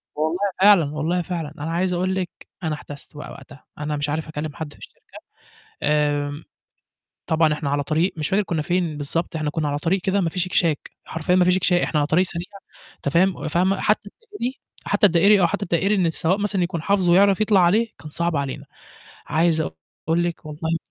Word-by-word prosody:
والله 160 +4 -1 0.2
فعلًا 200 -5 +7
والله 170 +4 0
فعلًا 165 -4 -4
أنا 155 +3 -4
عايز 180 +2 0
أقول 185 +2 0
لِك 185 -2 -2 0.3
أنا 155 -1 -1
احتَسْت 145 0 -11
بقى 150 - -8
وقتها، 135 +1 -13
أنا 150 0 -3
مش 145 +1 -2
عارف 155 +2 -2
أكلّم 155 -1 -5
حد 155 -2 -6
في - - -20
الشركة - - -14 0.8
آمم، 145 0 0 0.8
طبعًا 160 -1 +3
إحنا 150 -1 -3
على 145 0 0
طريق 160 +5 +1
مش 155 - -2
فاكر 200 +2 +2
كنّا 170 -5 -2
فين 175 -1 -1
بالضبط 160 +3 -3
إحنا 155 -1 -1
كنّا 150 0 -2
على 145 - -2
طريق 175 +5 0
كده 195 +1 +1
ما 170 - +1
فيش 180 +1 -1
اكشاك 165 -4 +1
حرفيًا 165 +3 0
ما 180 - +4
فيش 180 0 +4
اكشا 180 -1 +3
إحنا 155 - 0
على 145 - +1
طريق 175 +4 +3
سريع 175 -1 -4 0.5
أنت - - -3
فاهم 180 +5 +3
وفاهمة، 180 +5 0
حتى 210 -1 +1 0.2
الدائري 260 -9 -3 0.3
حتى 205 +1 +3
الدائري 195 +3 +5
آه، - - +5
حتى 200 +4 -1
الدائري 195 +3 +1
إن 185 -3 +2
السواق 165 +4 +1
مثلًا 205 -3 0
يكون 170 -2 -3
حافظه 190 0 +2
ويعرف 195 +3 +5
يطلع 210 -2 +4
عليه 205 +7 +3
كان 155 - -9
صعب 170 +2 -1
علينا، 140 -2 -3 0.6
عايز 160 0 +2
أقول 160 - -3
لِك 175 -1 -4
والله 160 +2 -2
170 Hz, 200 wpm, -22 LUFS, 150-185 Hz, 0.8 s, فعلًا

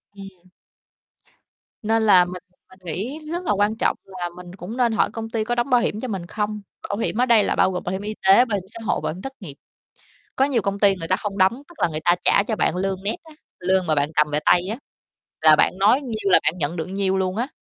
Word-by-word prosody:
Ừm. 190 -2 -13 1.3
Nên 225 +1 +1
là 185 -4 +6
mình 180 0 -8 0.3
mình 185 0 -19
nghĩ 215 - -4
rất 350 +1 -3
là - - +1
quan 205 +2 +1
trọng - - 0
là 180 -2 -6
mình 180 0 -11
cũng 200 +6 -8
nên 240 -2 +2
hỏi 220 - +1
công 225 0 -5
ty 225 -1 -1
có 240 +2 -2
đóng 240 +3 -1
bảo 245 -1 +4
hiểm 210 - -2
cho 255 - -4
mình 190 -6 -4
không? 210 +2 -3 0.3
Bảo 200 - -2
hiểm 225 - -2
ở - - +4
đây 230 -4 +5
là - - 0
bao 190 - +3
gồm 180 - -4
bảo 180 - -3
hiểm 190 +1 -3
y 210 +1 -4
tế, 220 +6 +7
bảo 215 -4 -2
hiểm 185 - -7
xã 230 - -9
hội, - - 0
bảo - - -2
hiểm 185 - -10
thất 270 0 -7
nghiệp. 150 -9 -9 0.8
Có 270 - +3
nhiều 255 -6 0
công 200 0 -3
ty 200 -2 +4
người 165 -3 -6
ta - - +2
hông 205 -1 -5
đóng, 195 +8 +2
tức 345 - -17
là - - +3
người 155 -1 -4
ta 175 0 +5
trả 200 - +4
cho 220 0 -2
bạn 175 - 0
lương 190 0 -1
net 210 - -1
á, 320 -1 -16 0.3
lương 185 0 +1
mà 155 - +2
bạn 145 +1 +1
cầm 150 0 +4
về 150 - +1
tay 175 - +5
á, 225 - -3 0.6
là 155 -1 +7
bạn - - +3
nói 230 +8 +4
nhiêu 220 -6 -3
là - - +8
bạn 155 - +3
nhận 155 +1 -2
được 160 - -3
nhiêu 190 0 -1
luôn 185 +1 -1
á. 245 +3 -1
200 Hz, 270 wpm, -22 LUFS, 180-225 Hz, 1.3 s, là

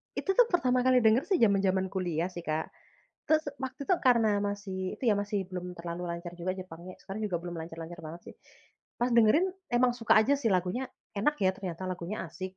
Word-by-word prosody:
Itu 390 - 0
tuh, - - +7
pertama 255 - +2
kali 255 -1 +5
denger 225 +4 +5
sih, 385 - +3
jaman-jaman 195 -3 +3
kuliah 175 -3 -1
sih, 175 -1 -7
Kak. 155 +1 -1 0.6
Terus, 315 0 +2 0.2
waktu 260 +1 -5
itu, 370 - +4
karena 235 -4 +4
masih 200 -2 -3
itu - - -6
ya, 215 - +5
masih 205 -1 -2
belum 180 -1 -5
terlalu 170 +1 -5
lancar 170 0 -5
juga 175 +2 -2
jepangnya- 185 -1 -9
sekarang 195 +3 -6
juga 195 -4 -1
belum 175 0 -6
lancar-lancar 165 +1 -8
banget, 160 +2 -8
sih- - - -29 0.6
pas 240 - +2
dengerin, 235 - +5 0.3
emang 245 0 +4
suka 230 -2 +4
aja, 270 +6 +3
sih. 255 -5 0
Lagunya 185 +7 0 0.3
enak, 295 +9 +2
ya, 185 - +4
ternyata, 185 -2 -6
lagunya 180 +3 -4
asik. 185 0 -7
195 Hz, 195 wpm, -30 LUFS, 175-240 Hz, 0.6 s, tuh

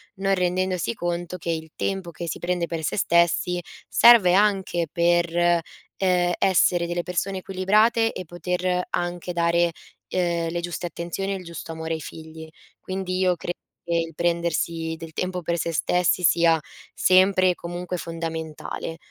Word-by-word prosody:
non 195 0 0
rendendosi 180 +2 0
conto 175 0 -3
che 170 - -6
il 160 -1 -4
tempo 190 -3 -2
che 170 +1 -6
si - - -4
prende 175 -1 -1
per 165 -1 -4
se - - -1
stessi 170 0 +2 0.3
serve 225 -7 +7
anche 195 -4 +2
per, 175 0 +3 0.7
ehm, 180 -2 +2
essere 180 -2 +3
delle 175 0 -2
persone 185 +2 -2
equilibrate 215 +5 +2
e 185 - -6
poter 180 +1 -2
anche 175 0 -3
dare, 170 0 +2 0.4
ehm, 170 -2 0
le 175 - -2
giuste 175 +1 -4
attenzioni 175 +4 -4
e - - -2
il 185 - -9
giusto 170 -1 -8
amore 160 0 -4
ai 160 - -4
figli. 160 0 -9 0.3
Quindi 185 -1 -3
io 185 -1 +3
credo 175 +1 -5 0.2
che 170 0 -3
il 165 -1 -3
prendersi 170 -1 -1
del 165 0 -9
tempo 180 +1 -2
per 170 +2 -1
se 170 - -1
stessi 180 +2 +1
sia 165 0 +4 0.4
sempre 185 0 +4
e 180 - -4
comunque 175 +1 -5
fondamentale, 165 -1 -5
175 Hz, 155 wpm, -24 LUFS, 170-185 Hz, 0.7 s, serve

